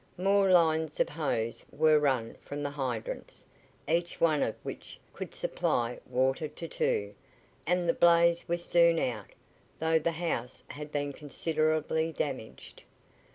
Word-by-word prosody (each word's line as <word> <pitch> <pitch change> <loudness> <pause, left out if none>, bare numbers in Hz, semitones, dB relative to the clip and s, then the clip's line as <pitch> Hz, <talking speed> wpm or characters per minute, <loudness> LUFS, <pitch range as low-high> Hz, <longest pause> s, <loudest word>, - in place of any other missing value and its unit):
More 195 +1 +3
lines 160 -3 +3
of - - +2
hose 115 -7 -2
were 155 0 +4
run 130 -6 0
from 145 +1 -6
the 145 - -2
hydrants, 130 -6 -5 0.4
each 170 +2 0
one 155 -3 +3
of - - 0
which - - -8
could - - -7
supply 120 0 -1
water 130 +5 +1
to 150 +3 -8
two, 100 -9 -1 0.5
and 180 0 +1
the 170 - +4
blaze 170 0 +4
was 170 0 -2
soon 170 -1 +5
out, 115 -9 -2 0.5
though 160 0 +2
the 165 +2 -1
house 155 -7 -3
had 150 0 -8
been 145 -1 -2
considerably 155 +2 -1
damaged. 135 -8 -5
155 Hz, 140 wpm, -30 LUFS, 135-170 Hz, 0.5 s, soon